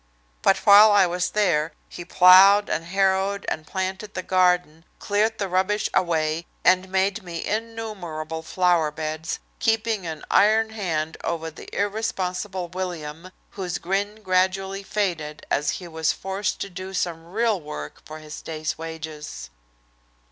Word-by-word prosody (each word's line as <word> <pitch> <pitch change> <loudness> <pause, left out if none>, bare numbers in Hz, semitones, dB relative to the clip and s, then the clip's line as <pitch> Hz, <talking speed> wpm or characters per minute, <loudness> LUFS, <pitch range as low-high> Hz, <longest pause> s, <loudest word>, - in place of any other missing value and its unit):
But 195 - +4
while 210 +1 +9
I 200 -2 +6
was 180 +1 -1
there 170 -6 +1
he 175 - -8
ploughed 190 +3 +7
and 165 - -1
harrowed 195 +2 +1
and 155 0 -4
planted 190 +2 -4
the 185 - -3
garden, 180 -4 +2
cleared 215 +2 0
the 200 - -2
rubbish 190 +3 0
away, 160 -2 0 0.2
and 185 +1 +4
made 195 +3 0
me 170 -3 -6
innumerable 205 -8 -4
flower 175 -1 +2
beds, 155 +1 -4 0.2
keeping 225 -4 0
an 160 -2 -6
iron 220 +2 +4
hand 165 -7 -3
over 165 -1 -3
the 160 - -12
irresponsible 195 -3 -2
William, 175 -2 -5 0.2
whose 180 -3 -4
grin 205 +4 -2
gradually 190 +1 0
faded 175 -7 -3
as 145 0 +1
he 180 - -9
was 160 -1 0
forced 195 +2 -3
to 200 - -3
do 185 +1 -7
some 170 -2 -2
real 220 -2 +1
work 75 - -8
for 155 - -9
his 155 -1 -9
day's 155 0 -4
wages. 155 - -7
185 Hz, 140 wpm, -24 LUFS, 160-200 Hz, 0.2 s, while